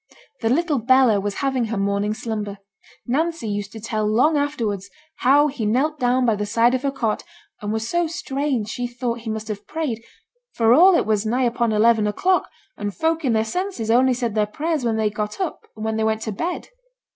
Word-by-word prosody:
The 225 - +1
little 300 +1 +1
Bella 250 -2 +4
was 200 0 -3
having 260 -3 +1
her 225 -1 -3
morning 200 +2 0
slumber; 210 -3 -4 0.5
Nancy 320 +1 -1
used 205 -1 -3
to 220 - -7
tell 220 -1 -2
long 250 +9 +3
afterwards 230 -10 -1 0.3
how 280 +4 +5
he 270 -6 -3
knelt 270 +8 +1
down 250 +1 +2
by 225 -3 +3
the 210 0 -2
side 235 +3 +3
of 260 - 0
her 280 - 0
cot, 235 -6 -1 0.4
and 205 0 -3
was 220 0 -2
so 345 +5 +1
strange 275 -7 -2
she 245 +2 -3
thought 240 -1 -3
he 230 -1 -7
must 220 0 -4
have 210 -2 -6
prayed, 275 -9 -3 0.5
for 230 0 +4
all 360 +7 +7
it - - +2
was 215 -2 +1
nigh 240 +4 0
upon 235 -1 +1
eleven 215 0 +4
o'clock, 365 - +1 0.3
and 205 -1 -4
folk 325 0 0
in 255 -4 +2
their 220 0 +2
senses 250 - -2
only 255 +2 +4
said 235 -3 -2
their 210 -1 +1
prayers 305 +6 -2
when 230 -2 0
they 215 -1 +1
got 210 - -4
up, 370 -5 -4
and 215 0 -6
when 220 0 -1
they 220 - 0
went 220 0 0
to 220 - -3
bed. 340 - -4
230 Hz, 215 wpm, -22 LUFS, 215-275 Hz, 0.5 s, all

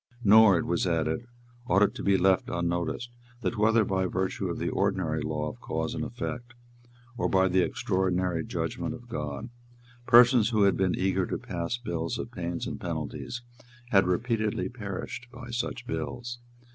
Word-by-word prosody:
Nor, 105 -2 +7
it - - -1
was 85 +2 0
added, 80 +6 0 0.4
ought 100 -4 +4
it - - +2
to - - -7
be 100 -1 +3
left 95 0 +3
unnoticed 85 +7 -2 0.3
that, 110 +2 -1
whether 110 0 +4
by 95 -1 0
virtue 95 +1 -2
of - - -3
the - - -2
ordinary 80 -4 0
law 75 0 -2
of 75 - -7
cause - - -2
and - - -3
effect, 120 0 -5 0.6
or - - 0
by 95 0 +4
the 95 0 +3
extraordinary 95 -7 0
judgment - - -3
of 120 - -13
God, 75 - -5 0.6
persons 120 -2 +7
who 110 -4 +3
had 100 -1 +4
been 95 -2 +1
eager 95 -1 +1
to - - -2
pass 85 +7 -3
bills 85 -9 -3
of 115 - -5
pains 85 -5 -4
and - - -5
penalties, 125 +1 -4 0.5
had 95 -2 +5
repeatedly 110 +3 0
perished 110 +1 -6
by 125 -1 -9
such 120 +1 -3
bills. 120 0 -4
95 Hz, 170 wpm, -28 LUFS, 90-120 Hz, 0.6 s, Nor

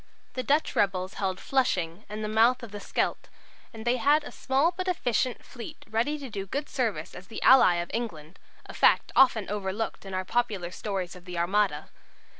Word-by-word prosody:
The 255 - -2
Dutch 290 +4 +1
rebels 190 -1 +1
held 190 -1 -1
Flushing 190 -8 0
and 210 +1 -5
the - - -1
mouth 230 +4 +3
of 230 - -8
the 205 - -6
Scheldt, - - -2 0.4
and 220 0 -9
they 240 +1 +2
had 290 +5 +3
a - - -8
small 270 +6 +1
but 370 +1 -4
efficient 255 -8 0
fleet 240 -4 -10
ready 230 +7 0
to 280 -2 -7
do 200 -4 -5
good 285 +8 -3
service - - -2
as - - -11
the - - -7
ally 255 -9 +7
of 175 0 -3
England 180 -9 -5 0.3
a - - -10
fact - - +3
often 235 -6 +5
overlooked 205 +2 -3
in 195 -1 -6
our 185 0 -2
popular 205 -6 -1
stories 190 -3 -4
of 180 -1 -14
the 180 -2 -6
Armada. 195 +4 0
215 Hz, 195 wpm, -27 LUFS, 190-255 Hz, 0.4 s, ally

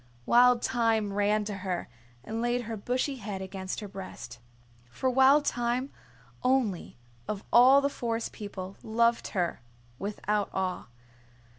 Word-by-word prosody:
Wild 245 0 +5
Thyme 225 -4 +1
ran 205 +1 +1
to 205 -1 -4
her 185 -2 -3 0.4
and 225 +9 -4
laid 240 +1 0
her 225 0 -5
bushy 255 +6 -2
head 205 -4 -5
against 190 +1 -5
her 210 - -6
breast. 185 - -9 0.5
For 260 - -1
Wild 265 +3 +5
Thyme 245 +2 -1 0.5
only 250 - 0 0.3
of 210 -1 -4
all 260 +4 +8
the 280 - +2
Forest 230 -4 -3
People 195 -2 -7
loved 230 +1 +1
her 175 -7 -1 0.4
without 205 0 -1
awe. 185 -1 -2
220 Hz, 135 wpm, -29 LUFS, 195-245 Hz, 0.5 s, all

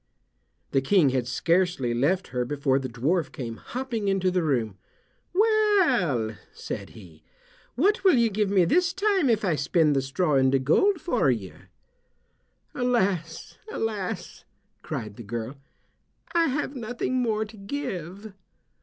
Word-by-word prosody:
The 135 - +2
King 155 +1 +4
had 125 -2 -1
scarcely 165 -2 +1
left 155 +11 0
her 125 0 -1
before 135 +1 0
the 130 -1 -5
dwarf 145 +9 0
came 115 -4 -6
hopping 240 -5 -4
into 190 -1 +1
the 180 0 +1
room. 120 - -1 0.5
"Well," 355 - +2
said - - -6
he, 85 -7 -15 0.5
"what 380 - +2
will 375 -6 +6
you 235 -2 +3
give 205 0 0
me 190 -3 +4
this 345 - +2
time 380 -6 +2
if 220 -2 +2
I 180 - +2
spin 150 +1 +2
the 135 - +1
straw 145 +3 0
into 130 0 +3
gold 325 - +2
for 245 - +1
you?" 110 -7 -2 1.2
"Alas, 190 -10 -1
alas!" 210 - -4 0.4
cried 105 -2 -6
the 120 - -8
girl, 115 +5 -5 0.8
"I 335 -1 +3
have 280 +1 -2
nothing 245 +1 -2
more 220 -2 0
to 215 - -14
give." 200 - -6
185 Hz, 140 wpm, -26 LUFS, -, 1.2 s, will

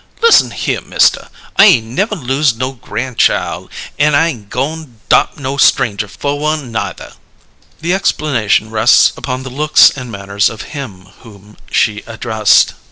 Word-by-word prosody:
"Listen 465 - +5
here, - - -3
Mister! - - +1 0.3
I 195 - +8
ain' 120 - +3
never 210 - -1
los' 135 - 0
no 130 +3 -3
gran' 130 0 -6
child, - - 0 0.3
an' 150 0 +3
I 165 +3 +3
ain' 110 -10 -8
goin' 140 +1 -5
'dop' - - +2
no 135 0 -4
stranger 105 -6 +2
fer 140 +8 -4
one, 150 -3 -3
neither!" 100 -5 -5 0.7
The 170 +3 -1
explanation 125 - 0
rests 110 +2 +4
upon 130 -1 -5
the 130 - -8
looks 150 +4 +4
and 125 -3 -8
manners 100 0 -1
of 110 - -8
him 105 -11 -8
whom 105 -2 -16 0.2
she 105 -1 0
addressed. 110 -2 +2
125 Hz, 155 wpm, -14 LUFS, 110-150 Hz, 0.7 s, I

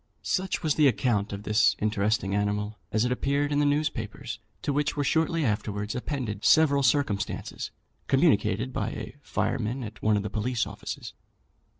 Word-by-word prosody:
Such 190 -1 -1
was 155 -2 +2
the 150 -1 +5
account 115 -6 +1
of 100 0 -5
this 105 +1 +3
interesting 105 -2 0
animal 105 +1 -1
as 110 +2 +2
it 125 - 0
appeared 140 +3 0
in 145 - +2
the 145 - +3
newspapers, 145 -7 -2 0.2
to 145 - 0
which 150 +1 0
were 145 - +1
shortly 160 +1 +1
afterwards 105 -2 -1
appended 125 -6 -3
several 145 -3 +5
circumstances 125 -6 0 0.4
communicated 130 - +2
by - - -1
a 110 +3 -7
fireman 120 -1 -1
at 110 -1 -8
one 110 -1 +3
of 100 - -1
the 105 - -3
police 115 +2 0
offices. 100 +1 -7
115 Hz, 165 wpm, -27 LUFS, 105-145 Hz, 0.4 s, the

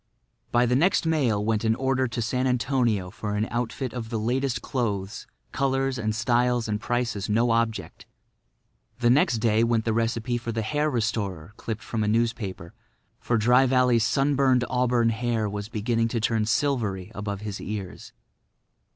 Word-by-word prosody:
By 120 +1 +4
the 125 +1 +2
next 170 +6 +3
mail 125 -11 +1
went 110 -1 0
an 110 0 +2
order 130 0 0
to 115 0 -3
San 125 +4 0
Antonio 120 -7 0
for 105 +1 -4
an 105 +1 0
outfit 120 +1 -3
of 115 -3 -5
the 115 - -2
latest 125 +4 -1
clothes, 105 -6 -3 0.2
colours 135 -1 0
and 110 -1 -1
styles 120 0 +1
and 105 0 -2
prices 115 -5 -2
no 115 +3 +2
object. 110 -6 -2 0.9
The 120 -1 +3
next 125 -3 +3
day 110 0 +2
went 115 -1 +1
the 115 - +1
recipe 115 +2 -1
for 115 0 -4
the 110 -1 -2
hair 150 +6 0
restorer 105 - -2
clipped 110 -2 -5
from 110 -2 -2
a - - -1
newspaper; 110 -6 -1 0.5
for 120 - 0
Dry 125 +4 +4
Valley's 125 -3 +3
sunburned 135 0 +2
auburn 125 -2 +2
hair 115 -1 -1
was 105 0 -5
beginning 115 +1 0
to 115 0 -2
turn 110 -1 0
silvery 110 -7 0
above 100 -1 -4
his 105 -2 -5
ears. 100 -3 -6
115 Hz, 165 wpm, -25 LUFS, 110-125 Hz, 0.9 s, By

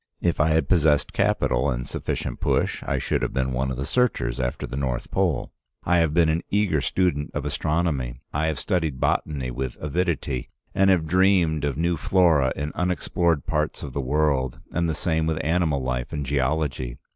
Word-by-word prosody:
If 85 - 0
I 75 - +4
had 80 +1 +2
possessed 80 -5 +3
capital 60 +3 +1
and 60 -1 -2
sufficient - - -4
push, - - 0
I - - -1
should - - -1
have - - -2
been 65 -1 0
one 65 +1 0
of 65 - -4
the 65 - -3
searchers 70 - 0
after 60 -1 -2
the - - -6
North 65 -3 -2
Pole. - - 0 0.3
I 90 - +3
have 80 -2 +2
been 85 +1 +4
an 80 +2 +1
eager 100 -8 +1
student 75 -5 0
of - - -2
astronomy. 75 -7 -1
I 75 +2 0
have 80 -3 -1
studied 80 -9 -1
botany 65 -2 0
with 65 0 -4
avidity, 80 -4 -2 0.2
and 95 0 +4
have 90 -4 +3
dreamed 90 -3 +3
of 70 -2 -1
new 85 +1 +1
flora 75 -2 +3
in 75 +2 -3
unexplored 85 -3 0
parts 75 0 -1
of 70 - -6
the 70 - -1
world, 70 -1 0
and 85 0 0
the 80 - -1
same 80 -2 0
with 80 -1 0
animal 80 -4 +1
life 65 +1 -2
and 75 -3 -3
geology. 65 -2 -1
75 Hz, 190 wpm, -24 LUFS, 65-85 Hz, 0.3 s, I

